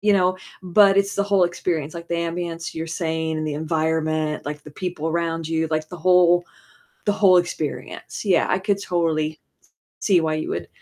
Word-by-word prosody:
you 210 Hz, 0 st, +3 dB
know, 185 Hz, -1 st, +2 dB, 0.2 s
but 195 Hz, +2 st, +5 dB
it's 200 Hz, 0 st, +2 dB
the 200 Hz, -, +2 dB
whole 200 Hz, -3 st, +3 dB
experience, 165 Hz, -3 st, -2 dB
like 170 Hz, 0 st, -8 dB
the 170 Hz, -, -1 dB
ambiance 170 Hz, 0 st, -3 dB
you're 160 Hz, 0 st, -4 dB
saying 160 Hz, -1 st, -2 dB
and 155 Hz, 0 st, -2 dB
the 150 Hz, -, -2 dB
environment, 155 Hz, -1 st, -1 dB
like, 150 Hz, 0 st, -5 dB
the 150 Hz, -, -12 dB
people 170 Hz, -1 st, -4 dB
around 165 Hz, -1 st, -1 dB
you, 160 Hz, 0 st, 0 dB
like, 155 Hz, 0 st, -1 dB
the 180 Hz, -, -7 dB
whole 175 Hz, 0 st, +4 dB, 0.6 s
the 205 Hz, -, +2 dB
whole 190 Hz, -3 st, +5 dB
experience. 175 Hz, +2 st, -3 dB
Yeah, 185 Hz, -4 st, +3 dB
I 190 Hz, -, +2 dB
could 200 Hz, +1 st, 0 dB
totally 160 Hz, -3 st, 0 dB
s -, -, -25 dB, 0.6 s
see 185 Hz, -5 st, +3 dB
why 155 Hz, -1 st, 0 dB
you 155 Hz, -, -3 dB
would -, -, -3 dB
170 Hz, 195 wpm, -22 LUFS, 160-180 Hz, 0.6 s, but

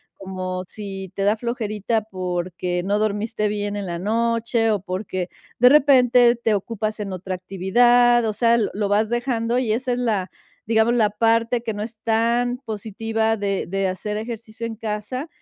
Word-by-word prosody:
como 185 Hz, -1 st, -5 dB
si 195 Hz, -2 st, -7 dB
te 195 Hz, -, -1 dB
da 205 Hz, +2 st, +3 dB
flojerita 220 Hz, -2 st, -2 dB
porque 180 Hz, -2 st, -3 dB
no 205 Hz, +2 st, 0 dB
dormiste 215 Hz, 0 st, -1 dB
bien 205 Hz, 0 st, -2 dB
en 200 Hz, -2 st, -4 dB
la 170 Hz, -, -3 dB
noche 230 Hz, +3 st, +1 dB
o 210 Hz, -2 st, +1 dB
porque 185 Hz, -1 st, -4 dB, 0.3 s
de 250 Hz, -, +8 dB
repente 250 Hz, -4 st, +5 dB
te 230 Hz, -2 st, 0 dB
ocupas 215 Hz, +1 st, -2 dB
en 200 Hz, -2 st, -4 dB
otra 185 Hz, +1 st, -5 dB
actividad, 240 Hz, +6 st, +3 dB
o 215 Hz, -, -1 dB
sea, 230 Hz, +2 st, +3 dB
lo 225 Hz, -, +1 dB
lo 205 Hz, 0 st, -1 dB
vas 210 Hz, +2 st, +2 dB
dejando 240 Hz, -1 st, 0 dB
y 230 Hz, -4 st, 0 dB
esa 250 Hz, +2 st, 0 dB
es -, -, -2 dB
la, 210 Hz, -6 st, 0 dB, 0.4 s
digamos, 225 Hz, +1 st, +3 dB
la 220 Hz, -3 st, +3 dB
parte 230 Hz, +2 st, +1 dB
que 220 Hz, -2 st, -2 dB
no 205 Hz, -, -5 dB
es 220 Hz, -1 st, -9 dB
tan 235 Hz, +2 st, +1 dB
positiva 225 Hz, -1 st, -2 dB
de 200 Hz, -1 st, -1 dB
de 195 Hz, +1 st, -1 dB
hacer 210 Hz, +3 st, -3 dB
ejercicio 225 Hz, 0 st, -6 dB
en 225 Hz, -, -6 dB
casa. 220 Hz, +6 st, -4 dB
220 Hz, 175 wpm, -22 LUFS, 200-235 Hz, 0.4 s, de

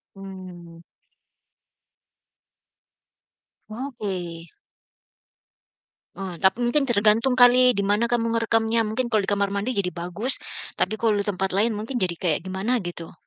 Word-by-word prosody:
Mmm. 180 Hz, -3 st, -11 dB, 2.9 s
Oke. 195 Hz, -9 st, -6 dB, 1.7 s
Oh, 185 Hz, -1 st, -6 dB
tapi 190 Hz, +7 st, +2 dB
mungkin 245 Hz, +4 st, +1 dB
tergantung 225 Hz, +1 st, +3 dB
kali 250 Hz, 0 st, +6 dB
di 200 Hz, -, -1 dB
mana 205 Hz, +3 st, +1 dB
kamu 230 Hz, -1 st, 0 dB
ngerekamnya. 225 Hz, 0 st, +1 dB
Mungkin 240 Hz, +3 st, -2 dB
kalau 215 Hz, -4 st, +1 dB
di -, -, -2 dB
kamar 200 Hz, 0 st, 0 dB
mandi 200 Hz, +5 st, -2 dB
jadi 200 Hz, -5 st, 0 dB
bagus, 180 Hz, +9 st, -2 dB, 0.4 s
tapi 195 Hz, -, 0 dB
kalau 220 Hz, -1 st, +1 dB
di 200 Hz, -, -1 dB
tempat 195 Hz, -1 st, -1 dB
lain 220 Hz, +3 st, +2 dB
mungkin 220 Hz, +5 st, -4 dB
jadi 185 Hz, -6 st, +1 dB
kayak 170 Hz, -1 st, -1 dB
gimana 190 Hz, +7 st, -1 dB
gitu. 170 Hz, -1 st, -6 dB
205 Hz, 125 wpm, -24 LUFS, 185-235 Hz, 2.9 s, kali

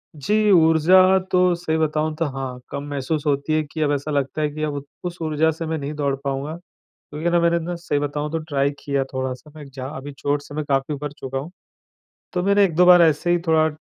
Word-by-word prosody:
जी, 150 Hz, +9 st, -1 dB, 0.2 s
ऊर्जा 180 Hz, +3 st, +6 dB
तो 180 Hz, -, +3 dB, 0.2 s
सही 160 Hz, -2 st, -2 dB
बताऊँ 155 Hz, 0 st, 0 dB
तो 165 Hz, -, +1 dB
हाँ, 130 Hz, -2 st, -5 dB
कम 140 Hz, 0 st, -5 dB
महसूस 145 Hz, +2 st, -2 dB
होती 140 Hz, +2 st, 0 dB
है 155 Hz, -, +2 dB
कि 155 Hz, +1 st, -7 dB
अब 145 Hz, -, +2 dB
ऐसा 145 Hz, +2 st, -3 dB
लगता 140 Hz, +1 st, -1 dB
है 150 Hz, -, +1 dB
कि 155 Hz, +1 st, -5 dB
अब 150 Hz, -1 st, -1 dB
उ -, -, -4 dB, 0.3 s
उस 175 Hz, 0 st, -7 dB
ऊर्जा 155 Hz, 0 st, +1 dB
से 160 Hz, +1 st, -6 dB
मैं 160 Hz, 0 st, -2 dB
नहीं 145 Hz, +1 st, -5 dB
दौड़ 140 Hz, -2 st, -1 dB
पाऊँगा। 140 Hz, +3 st, -3 dB
क्योंकि 170 Hz, -2 st, -7 dB
ना 175 Hz, 0 st, +3 dB
मैंने 170 Hz, 0 st, +2 dB
ना 175 Hz, -, -3 dB
सही 170 Hz, -4 st, -2 dB
बताऊँ 145 Hz, +1 st, -3 dB
तो 165 Hz, -, -1 dB
ट्राइ 140 Hz, -3 st, 0 dB
किया 140 Hz, -1 st, -1 dB
थोड़ा-सा, 130 Hz, +2 st, -4 dB
मैं 150 Hz, -, -9 dB
इगजा 135 Hz, -2 st, -8 dB
अभी 145 Hz, +2 st, -7 dB
चोट 145 Hz, 0 st, -1 dB
से 145 Hz, 0 st, -11 dB
मैं 155 Hz, -, -2 dB
काफ़ी 135 Hz, +1 st, 0 dB
उभर 145 Hz, 0 st, -5 dB
चुका 135 Hz, 0 st, -4 dB
हूँ। 150 Hz, +6 st, -6 dB, 0.8 s
तो 180 Hz, -1 st, -1 dB
मेरा 200 Hz, +1 st, +4 dB
1-2 180 Hz, -1 st, +4 dB
बार 180 Hz, -1 st, +8 dB
ऐसे 160 Hz, +2 st, +2 dB
ही 175 Hz, -, +3 dB
थोड़ा 160 Hz, -1 st, +4 dB
150 Hz, 230 wpm, -22 LUFS, 140-165 Hz, 0.8 s, बार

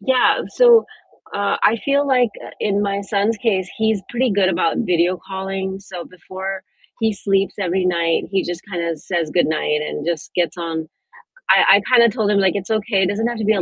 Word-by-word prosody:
Yeah, 260 Hz, -1 st, +2 dB, 0.2 s
so, 480 Hz, -2 st, +6 dB, 0.5 s
uh, 200 Hz, 0 st, 0 dB
I 220 Hz, -, +4 dB
feel 280 Hz, +1 st, +2 dB
like, 250 Hz, -4 st, +3 dB
uh, -, -, -9 dB
in 205 Hz, -1 st, 0 dB
my 200 Hz, -1 st, -1 dB
son's 200 Hz, +2 st, 0 dB
case, 195 Hz, -5 st, -1 dB
he's 220 Hz, -2 st, 0 dB
pretty 245 Hz, 0 st, 0 dB
good 195 Hz, -2 st, +2 dB
about 170 Hz, -2 st, 0 dB
video 180 Hz, -3 st, +1 dB
calling, 190 Hz, 0 st, -4 dB
so 185 Hz, -3 st, -8 dB
before 190 Hz, +1 st, -7 dB, 0.4 s
he 220 Hz, -1 st, +2 dB
sleeps 195 Hz, -1 st, 0 dB
every 185 Hz, 0 st, 0 dB
night, 170 Hz, -2 st, +1 dB
he 195 Hz, -1 st, +1 dB
just 175 Hz, -1 st, -5 dB
kinda 170 Hz, -2 st, -2 dB
says 165 Hz, +1 st, -3 dB
goodnight 155 Hz, -2 st, 0 dB
and 150 Hz, 0 st, -5 dB
just 170 Hz, -3 st, -3 dB
gets 175 Hz, +1 st, 0 dB
on 165 Hz, -2 st, -4 dB, 0.6 s
I 195 Hz, -, +6 dB
I -, -, -1 dB
kinda 235 Hz, -1 st, +6 dB
told 215 Hz, -1 st, -1 dB
him, 200 Hz, -, +3 dB
like, 190 Hz, -1 st, +2 dB
"It's 200 Hz, +1 st, -4 dB
okay, 215 Hz, -2 st, +1 dB
it -, -, +2 dB
doesn't 220 Hz, +4 st, -1 dB
have 240 Hz, 0 st, -3 dB
to 220 Hz, -, -3 dB
be 215 Hz, -, +4 dB
a 195 Hz, -, 0 dB
195 Hz, 205 wpm, -19 LUFS, 180-220 Hz, 0.6 s, so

